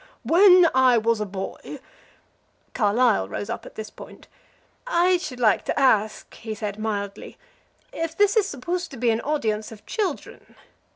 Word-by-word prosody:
When 360 Hz, 0 st, +6 dB
I 255 Hz, -2 st, +4 dB
was 225 Hz, -1 st, +1 dB
a 210 Hz, -, -2 dB
boy 195 Hz, 0 st, -7 dB, 0.5 s
" -, -, -41 dB
Carlyle 220 Hz, -, +2 dB
rose 105 Hz, 0 st, -5 dB
up -, -, -6 dB
at -, -, -14 dB
this 220 Hz, -1 st, -7 dB
point. -, -, -13 dB, 0.6 s
"I 365 Hz, -5 st, +3 dB
should 305 Hz, -8 st, -7 dB
like 215 Hz, -5 st, +3 dB
to -, -, -1 dB
ask," 215 Hz, -5 st, +1 dB
he 220 Hz, -1 st, -7 dB
said, 210 Hz, -1 st, -5 dB
mildly, 205 Hz, -2 st, -5 dB, 0.6 s
"if 330 Hz, 0 st, -4 dB
this 410 Hz, +1 st, +3 dB
is 425 Hz, -3 st, +3 dB
supposed 350 Hz, +5 st, -4 dB
to 270 Hz, -, -10 dB
be 235 Hz, 0 st, +1 dB
an 225 Hz, +1 st, -1 dB
audience 220 Hz, -8 st, -2 dB
of 215 Hz, -2 st, -13 dB
children? 390 Hz, -9 st, -5 dB
240 Hz, 165 wpm, -23 LUFS, 215-335 Hz, 0.6 s, When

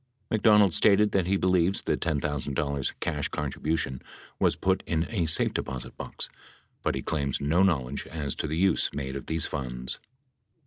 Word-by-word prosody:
McDonald 105 Hz, -4 st, +5 dB
stated 105 Hz, +3 st, +5 dB
that, 95 Hz, -3 st, +1 dB
he 100 Hz, +1 st, +2 dB
believes 95 Hz, 0 st, +2 dB
the -, -, +1 dB
$10,000 70 Hz, -2 st, -1 dB
cash 75 Hz, -2 st, -1 dB
contribution 75 Hz, -1 st, -2 dB, 0.4 s
was -, -, +3 dB
put 95 Hz, 0 st, +1 dB
in 80 Hz, 0 st, 0 dB
a 90 Hz, -8 st, 0 dB
safe 80 Hz, -, +3 dB
deposit 65 Hz, -2 st, -4 dB
box, -, -, -4 dB, 0.5 s
but -, -, 0 dB
he -, -, -4 dB
claims 70 Hz, -4 st, -1 dB
no 80 Hz, +6 st, +2 dB
knowledge 70 Hz, -8 st, 0 dB
as 75 Hz, -4 st, -3 dB
to -, -, -2 dB
the 80 Hz, +2 st, -2 dB
use 95 Hz, -1 st, +3 dB
made 65 Hz, -1 st, -4 dB
of 70 Hz, -, -6 dB
these 80 Hz, -1 st, +1 dB
funds. 65 Hz, -3 st, -3 dB
80 Hz, 165 wpm, -27 LUFS, 70-95 Hz, 0.5 s, McDonald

